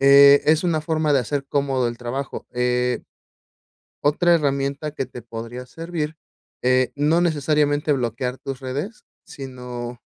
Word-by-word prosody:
eh, 140 +1 +8
es 155 +3 +4
una 160 -3 +1
forma 155 -1 0
de 140 - +5
hacer 140 +3 -3
cómodo 135 -3 +1
el 120 0 -6
trabajo. 130 +3 -5
Eh, 125 0 0 1.0
otra 170 +4 +3
herramienta 140 0 -1
que 135 -3 -3
te 125 - -10
podría 115 +2 -7
servir, 160 +1 -5 0.4
eh, 130 0 +3
no 155 +4 +3
necesariamente 150 -2 +2
bloquear 125 0 -2
tus 135 -1 -6
redes, 150 - -5 0.2
sino 125 -2 -7
140 Hz, 135 wpm, -22 LUFS, 125-150 Hz, 1.0 s, eh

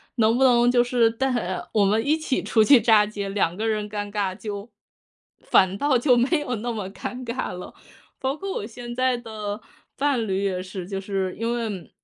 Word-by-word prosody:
能 230 0 +3
不 265 - +3
能 245 -1 +5
就 245 -1 +4
是 245 -2 +3
带 265 +4 -1 0.2
啊， 185 0 -4
我 210 - +4
们 215 +3 +2
一 300 - +3
起 310 -4 -1
出 220 - +3
去 265 +4 +7
炸 215 -3 +5
街， 205 -1 -5
2 195 -4 0
个 220 +2 -1
人 215 -1 -1
尴 205 -1 -4
尬， 200 -2 -1
就 205 +2 -6 0.7
反 190 +1 +3
倒 285 +2 +2
就 250 +1 +4
没 260 +7 +2
有 255 -5 -3
那 240 +3 -3
么 210 -5 -4
尴 250 +5 -6
尬 235 +2 -3
了。 180 0 -8 0.5
包 265 +1 -1
括 390 +5 -5
我 - - -4
现 240 +1 -8
在 255 0 +1
的 215 -2 -6 0.4
伴 275 -5 +1
侣 195 0 -1
也 185 -2 -1
是， 185 -1 -7
就 195 +1 -4
是 190 -1 -2
因 230 +1 -1
为， 230 -2 -2
嗯， 185 -5 -7
225 Hz, 225 characters per minute, -24 LUFS, 200-245 Hz, 0.7 s, 去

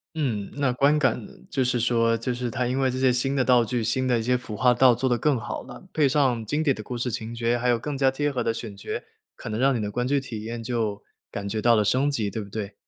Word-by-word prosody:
嗯， 115 -10 -2
那 140 -3 +1
观 140 +4 +3
感 135 -5 +1
呢， - - -15 0.2
就 135 - +1
是 125 0 +1
说， 115 0 +2
就 120 +2 -2
是 120 0 -3
它 120 +2 -1
因 125 +2 -1
为 130 -1 +2
这 130 +1 -3
些 130 -1 +3
新 135 +2 0
的 130 -2 +2
道 125 -1 +5
具， 115 0 -2
新 130 +4 0
的 125 -2 +3
一 - - -3
些 125 +2 +2
服 115 -4 -5
化 125 -1 +4
道 125 0 +5
做 130 +3 0
得 120 - +2
更 140 -1 +2
好 - - -5
了， - - -11
配 145 -3 +3
上 130 -6 +2
经 150 +7 0
典 140 -4 +2
的 110 - -7
故 125 +3 -6
事 120 0 -2
情 115 0 -5
节， 120 +1 +1
还 125 - 0
有 120 - +3
更 145 +5 -4
加 135 -1 +3
贴 145 +2 -1
合 125 -3 -2
的 115 - +1
选 115 -2 -6
角， 100 - -11 0.5
可 - - -8
能 110 +2 -3
让 135 0 +3
你 - - -1
的 105 -1 -3
观 125 +4 -1
剧 140 +1 +2
体 115 -5 -7
验 115 0 -5
就 110 -4 -2 0.3
感 100 - -5
觉 110 +1 -2
到 120 +1 +5
了 105 - +3
升 135 +7 +2
级， 115 -7 -1
对 110 - -4
不 100 - -9
对？ 105 -1 -5
125 Hz, 315 characters per minute, -25 LUFS, 115-130 Hz, 0.5 s, 道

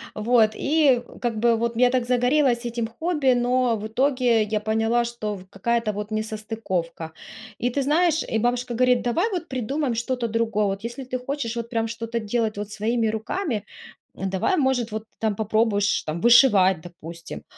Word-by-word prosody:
Вот, 220 0 +3
и, 280 -5 +3
э, - - -14
как 240 -2 -1
бы 235 +1 +3
вот 235 0 -2
я 245 0 +5
так 250 -2 +1
загорелась 250 0 +2
этим 235 -1 -2
хобби, 295 +1 +1
но 245 0 +2
в 210 - -6
итоге 250 -2 +2
я 215 0 -1
поняла, 225 +2 +1
что 215 -3 -4
в 185 - -11
какая-то 230 +2 -1
вот 210 +1 -5
несостыковка. 215 -6 -3 0.5
И 245 - 0
ты 280 +3 -1
знаешь, 320 +3 +2
и 220 - -2
бабушка 245 +1 -1
говорит: 250 +1 +3
"Давай 330 - +1
вот 350 -3 -3
придумаем 260 +2 -2
что-то 240 +1 -2
другое. 225 -2 0
Вот 195 +1 -3
если 240 +3 -5
ты 255 0 -4
хочешь 250 -3 -4
вот 235 0 -4
прям 225 -2 -1
что-то 230 +1 -4
делать 220 0 -1
вот 205 0 -4
своими 225 +2 0
руками, 220 - -3 0.5
давай, 190 - -1
может, 265 -5 +1
вот 215 0 -4
ты 220 - -41
там 220 -2 0
попробуешь 215 -1 +1
там 155 +2 -4
вышивать, 205 -8 +5
допустим". 170 -1 -10
235 Hz, 180 wpm, -24 LUFS, 215-250 Hz, 0.5 s, я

